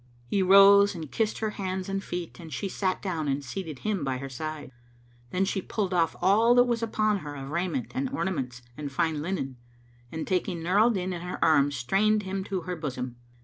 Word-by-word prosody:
He 195 +11 0
rose 200 +1 +7
and 160 -4 -7
kissed 220 -1 0
her 220 -1 -1
hands 190 -2 -3
and 195 0 -2
feet 175 -1 -5
and 165 -2 -10
she 200 - -3
sat 190 -1 -2
down 165 -6 -2
and 140 0 -1
seated 155 +2 -5
him 205 -7 0
by 135 -2 -1
her 135 +1 -6
side. 155 +1 -6 0.6
Then 185 +8 +1
she 195 0 -1
pulled 195 -1 -2
off 165 -2 +2
all 220 +6 +5
that 245 - +7
was 240 -2 -1
upon 215 -2 +1
her 145 -3 -7
of 135 0 -7
raiment 185 - -2
and 265 +1 -1
ornaments 135 - -3
and 145 -2 -5
fine 155 +1 0
linen 150 -7 -3 0.5
and 160 0 -4
taking 180 -2 -1
Nur 185 +4 +2
al 225 +3 +6
Din 185 -4 -1
in 175 - -5
her 180 +1 -5
arms 145 -2 +4
strained 210 - +2
him 190 0 -3
to 190 -3 -2
her 180 +2 -4
bosom. 130 -6 -5
180 Hz, 210 wpm, -27 LUFS, 150-200 Hz, 0.6 s, rose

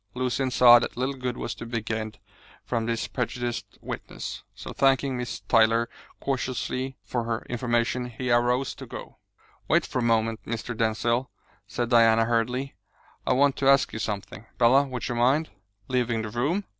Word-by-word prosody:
Lucian 130 +1 0
saw 120 -1 +8
that 120 - -4
little 130 +3 0
good 125 -2 -4
was 120 - -3
to 105 - -9
be 115 0 -2
gained 110 -1 -4 0.5
from 115 -1 -2
this 115 -1 -1
prejudiced 120 -1 -4
witness, - - -6
so - - -8
thanking 135 0 +2
Miss 125 -1 -4
Tyler 115 +1 +3 0.3
courteously 130 0 -2
for 120 -2 -2
her 115 0 -3
information, 120 0 0
he 125 +1 -3
arose 125 +2 +2
to - - -10
go. - - -9 0.5
"Wait - - +3
for 130 - -3
a - - 0
moment, 115 -1 +1
Mr. 115 +1 -4
Denzil," 115 +3 0 0.4
said 120 -1 -2
Diana 115 -1 +5
hurriedly. 125 +4 0 0.5
"I - - +4
want 140 +1 +3
to 135 -1 +3
ask 140 0 +4
you 110 - -4
something. 105 0 -5
Bella, 125 +4 +5
would 125 -3 -4
you - - -2
mind 130 +7 +2 0.2
" 100 0 -42
"Leaving 120 -3 0
the 110 - -5
room? 145 - 0
120 Hz, 170 wpm, -26 LUFS, 115-130 Hz, 0.5 s, saw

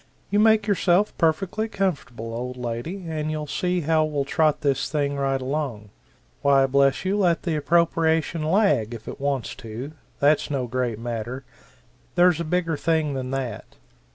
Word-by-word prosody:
You 205 - +3
make 220 -1 +5
yourself 200 -1 +2
perfectly 185 +6 +1
comfortable, 145 - -3
old 125 +2 -5
lady, 125 +11 -4
and 155 -1 -3
you'll 155 -1 -3
see 180 +4 -1
how 160 0 +2
we'll 150 -3 -1
trot 155 +1 +1
this 140 -1 0
right 140 -2 0
along. 130 -6 -3 0.5
Why 140 -1 +4
bless 140 +4 +2
you, 200 +2 +1
let 175 -4 +2
the 170 -3 -1
appropriation 160 0 +2
lag, 155 - +2
if 115 - -11
it - - -7
wants 140 -3 -1
to 115 +5 -7 0.3
that's 145 +2 +3
no 135 -3 -1
great 120 -2 -2
matter 120 +3 -5 0.7
there's 175 -2 +4
a - - -1
bigger 165 -1 0
thing 160 -2 +1
than 130 -1 -4
that." 130 -5 -5
150 Hz, 155 wpm, -24 LUFS, 130-170 Hz, 0.7 s, make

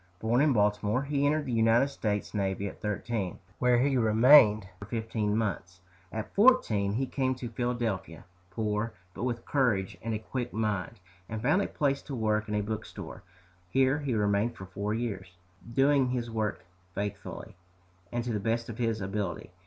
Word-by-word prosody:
Born 115 +6 +2
in 150 0 +4
Baltimore, 105 +2 +2
he 140 0 +1
entered 150 0 +1
the 130 - -3
United 115 +4 +4
States 105 -6 -2
navy 100 -1 -1
at - - -9
thirteen, 105 -2 -2 0.2
where 125 -1 +4
he 135 +2 +2
remained 110 -2 +6
for 100 - -8
fifteen 110 -2 -1
months. 90 -5 -3 0.3
At 110 0 -5
fourteen 160 - +4
he 130 +5 0
came 130 0 -1
to 125 -1 -6
Philadelphia, 115 -7 -3 0.2
poor, 105 +2 -2 0.2
but - - -4
with 120 -2 -3
courage 105 -9 +1
and 115 -1 -2
a - - 0
quick 120 +3 -4
mind, 105 -1 -2 0.3
and 110 - -3
found 150 +9 +3
a - - -1
place 140 -2 0
to 140 - -6
work 110 -2 0
in 105 - -1
a 105 - +1
bookstore. 110 +1 -6 0.5
Here 135 +4 +3
he 140 -5 -1
remained 105 +2 +1
for 95 - -9
four 100 +3 -4
years, 95 -6 -4 0.3
doing 135 +1 +4
his 120 -2 -2
work 110 -4 -2 0.3
faithfully, 100 +1 -5 0.6
and 120 0 -1
to 120 -1 -2
the 105 - 0
best 115 +3 -1
of 115 +1 -7
his 115 -2 0
ability. 95 -3 -3
110 Hz, 175 wpm, -29 LUFS, 105-125 Hz, 0.6 s, remained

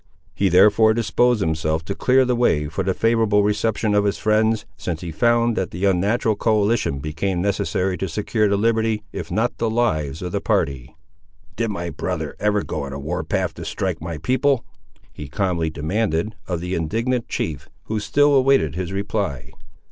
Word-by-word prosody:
He 100 - +1
therefore 105 +4 +5
disposed 120 0 +2
himself 80 -2 -1
to 100 - -3
clear 130 +5 +3
the 125 0 +1
way 80 -11 +2
for 85 +6 -3
the 95 0 0
favourable 110 -3 +2
reception 105 +1 0
of 105 0 +3
his 100 -1 0
friends, 110 0 +1
since 80 0 -4
he 85 - -5
found 120 +6 +2
that 95 -5 -1
the 90 +4 -3
unnatural 105 +4 +2
coalition 105 -7 +1
became 75 +6 -2
necessary 95 -1 -1
to 95 - -2
secure 105 +4 0
the 100 - +2
liberty, 110 0 +1
if - - -6
not 110 +7 -1
the 115 - +1
lives, 80 - -1
of 90 - -4
the - - -2
party. 70 +1 -1 0.6
"Did 115 +1 -1
my 85 -4 -4
brother - - -4
ever 105 0 +1
go 75 - -4
on 70 -1 -6
a 70 - -5
war 85 +6 -3
path - - -1
to - - -8
strike - - -3
my 85 -1 -5
people?" 130 - +1 0.5
he 75 - -8
calmly 85 +1 -1
demanded 85 +5 -1
of 85 -3 -2
the 90 +1 -4
indignant 115 +9 -1
chief, 75 -1 -4
who 110 0 -3
still 145 +7 +3
awaited 135 - +3
his 90 +1 -4
reply. 100 - -3
100 Hz, 180 wpm, -22 LUFS, 80-110 Hz, 0.6 s, therefore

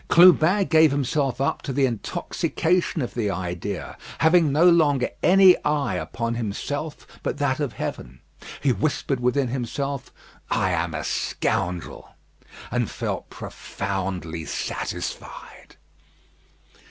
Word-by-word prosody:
Clubin 180 +2 +6
gave 160 -2 +5
himself 135 -2 0
up 135 - 0
to - - -4
the 135 +1 +2
intoxication 150 - -1
of 120 - -5
the 110 -4 -1
idea, 90 +1 -4 0.2
having 160 -2 +4
no 160 +5 +5
longer 150 -7 +4
any 190 0 +7
eye 150 -5 0
upon 115 +7 -3
him 115 -3 -2 0.7
but - - -3
that 145 -1 0
of 140 -6 -2
Heaven. 65 -7 -6 0.4
He 140 - +3
whispered 135 +3 -1
within 125 +1 +1
himself, 135 +2 -3 0.4
"I - - +1
am - - -1
a - - -3
scoundrel," 90 -3 -2 0.6
and - - 0
felt - - -4
profoundly 95 -4 -4
satisfied. - - -6
135 Hz, 115 wpm, -24 LUFS, 100-155 Hz, 0.7 s, any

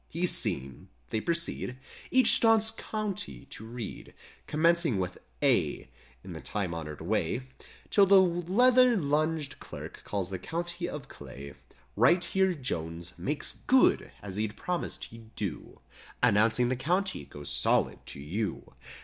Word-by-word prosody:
He's 175 +2 0
"seen." 70 - -2 0.2
They 110 - 0
proceed 170 -6 -1 0.3
Each 260 0 +5
staunch 225 -1 +4
county 200 - -4
to - - -8
read. 115 -2 -8 0.3
Commencing 165 - +3
with 90 -1 -3 0.2
"A," - - +2 0.3
In - - -8
the - - -7
time 95 -5 -2
honored 75 -2 -6
way, 110 +7 0 0.5
'Till 200 -1 +6
the 195 0 +8
leather 225 +8 +4
lunged 155 -1 0
clerk - - -9
calls 95 -2 -3
the 95 - -3
County 175 - -4
of 150 -3 -7
Clay: 70 0 -10 0.4
Right 175 0 +4
here 190 -1 +2
Jones 85 - -4
"makes 145 - -2
good" 260 0 +4
as 100 -1 -5
he 110 +1 +1
promised 175 +11 -4
he'd 115 -1 -12
do, 100 -6 -5 0.4
Announcing 110 +4 +4
the 130 - +1
county 180 +9 -1
goes 75 0 -5
solid - - +2
to - - -7
you. 95 +10 -4
130 Hz, 140 wpm, -29 LUFS, -, 0.5 s, the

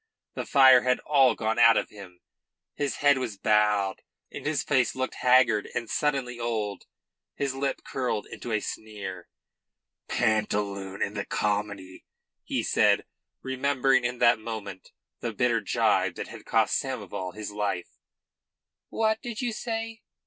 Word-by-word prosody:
The - - -5
fire 130 -3 +7
had 125 0 +2
all 135 -3 +4
gone 110 +1 -1
out 115 -2 +7
of - - -1
him. 95 -4 -13 0.5
His 145 -2 -2
head 145 -2 +3
was 115 -6 -4
bowed 105 -2 +2 0.3
and - - -6
his 155 -1 0
face 130 -4 +1
looked 130 0 -2
haggard 125 -4 +4
and 120 -1 -2
suddenly 135 -5 -1
old. 110 -4 -3 0.5
His 140 -2 -2
lip 135 0 -2
curled 125 -5 -2
into 120 - -8
a 110 -1 +1
sneer. 100 -5 -7 0.8
"Pantaloon 105 -4 -1
in 100 - -3
the 100 -1 -3
comedy," 100 -3 -3 0.4
he - - -2
said, - - +3 0.4
remembering 130 -1 +1
in 120 +1 -2
that 120 -1 +4
moment 110 -4 -7 0.3
the - - -4
bitter - - +1
gibe - - +1
that - - -6
had - - -11
cost - - +2
Samoval 90 -1 -5
his 110 -1 -6
life. 100 -4 -3 0.9
"What 220 0 0
did 235 -3 -6
you 245 -3 -1
say?" 225 0 -4
115 Hz, 145 wpm, -27 LUFS, 105-135 Hz, 0.9 s, fire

